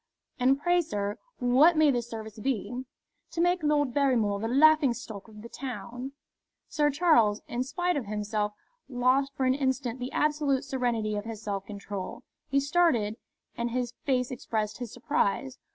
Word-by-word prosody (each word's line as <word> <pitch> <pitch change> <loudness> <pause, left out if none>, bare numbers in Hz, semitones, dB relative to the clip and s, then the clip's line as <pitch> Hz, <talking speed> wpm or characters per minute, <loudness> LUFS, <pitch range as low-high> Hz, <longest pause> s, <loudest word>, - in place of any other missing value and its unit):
"And 265 +2 +3
pray, 350 +3 +3
sir, 205 -10 -3 0.2
what 270 +7 +5
may 310 -2 +6
this 240 -2 -2
service 220 -1 -7
be?" 245 0 -2 0.5
"To - - -4
make 350 +1 +3
Lord 295 -4 +2
Barrymore 240 -8 +2
the 225 - -2
laughing 285 0 +5
stock 220 -4 -8
of 210 -1 -13
the - - -7
town." 250 +1 -6 0.5
Sir 295 -1 +2
Charles, 270 -9 +3
in 240 - -2
spite 355 +6 -1
of 265 -7 -3
himself, 210 0 -2 0.4
lost 260 +2 +2
for 265 - 0
an 255 - +4
instant 260 -2 -1
the 250 +1 -4
absolute 295 -3 +1
serenity 240 -6 -1
of 205 - -4
his 225 -1 -7
self 200 -2 -3
control. 200 -2 -6 0.3
He 275 - +3
started, 275 -8 +2 0.4
and 235 0 -2
his 245 0 -2
face 255 -2 0
expressed 220 -3 -3
his 245 -3 -5
surprise. 255 -1 -1
250 Hz, 165 wpm, -28 LUFS, 220-280 Hz, 0.5 s, may